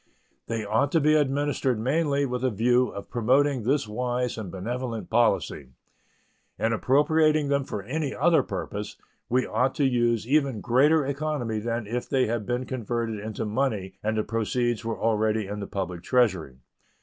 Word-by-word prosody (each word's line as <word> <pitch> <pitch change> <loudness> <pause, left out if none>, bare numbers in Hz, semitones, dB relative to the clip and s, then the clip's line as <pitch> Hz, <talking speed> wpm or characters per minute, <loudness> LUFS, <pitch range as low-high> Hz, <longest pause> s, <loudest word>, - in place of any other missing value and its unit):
They 115 -2 -3
ought 110 +7 +1
to 165 - +5
be 155 +1 +3
administered 145 -4 +1
mainly 140 +3 +1
with 125 -1 -3
a 130 - +3
view 120 +3 +2
of 100 - -9
promoting 130 +3 +2
this 130 +2 0
wise 125 +2 -2
and 110 -5 -6
benevolent 115 +4 -4
policy. 100 - +1 0.9
In 115 0 0
appropriating 150 +4 +3
them 140 -1 +1
for 100 - -5
any 140 +5 -3
other 165 +5 +4
purpose 105 +1 -5 0.3
we 125 +1 +2
ought 125 +4 0
to 145 - +2
use 120 -3 +1
even 140 -4 +2
greater 145 +7 +3
economy 140 -6 -2
than 115 +1 -3
if 120 +4 -4
they 130 -1 +2
had 110 -2 -2
been 125 +1 -1
converted 115 -3 -3
into 110 +1 -4
money 105 -4 -1
and 110 +1 -1
the 110 - +1
proceeds 120 +1 -1
were 115 0 -3
already 110 -1 +1
in 105 +2 -5
the 100 - -5
public 90 -3 -4
Treasury. 95 - +1
120 Hz, 165 wpm, -26 LUFS, 110-135 Hz, 0.9 s, to